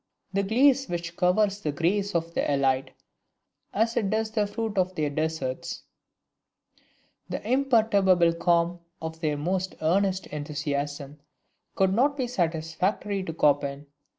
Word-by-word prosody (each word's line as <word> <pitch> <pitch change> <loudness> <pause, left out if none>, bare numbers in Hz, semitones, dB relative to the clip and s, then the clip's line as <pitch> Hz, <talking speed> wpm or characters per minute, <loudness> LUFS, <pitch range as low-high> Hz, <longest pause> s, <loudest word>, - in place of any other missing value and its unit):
The 200 - +2
GLACE 265 +6 +3
which 170 0 -4
covers 195 +3 +2
the 150 - -1
grace 195 +6 0
of 165 0 -1
the - - 0
ELITE, 135 -1 +1 0.8
as 225 +3 +1
it 205 -4 +1
does 220 +1 0
the 215 -2 +1
fruit 220 +1 -3
of 185 0 0
their 150 -3 -1
desserts; 155 -4 -3 1.5
the - - -5
imperturbable 215 -9 +3
calm 170 0 +1 0.2
of 160 0 -6
their 155 -3 -1
most 185 +5 -2
earnest 190 +3 +1
enthusiasm, 145 -1 -4 0.6
could 190 0 +2
not 280 +6 +2
be 260 - 0
satisfactory 185 0 -1
to 165 -4 -5
Chopin. 145 -1 +2
175 Hz, 130 wpm, -26 LUFS, 155-205 Hz, 1.5 s, GLACE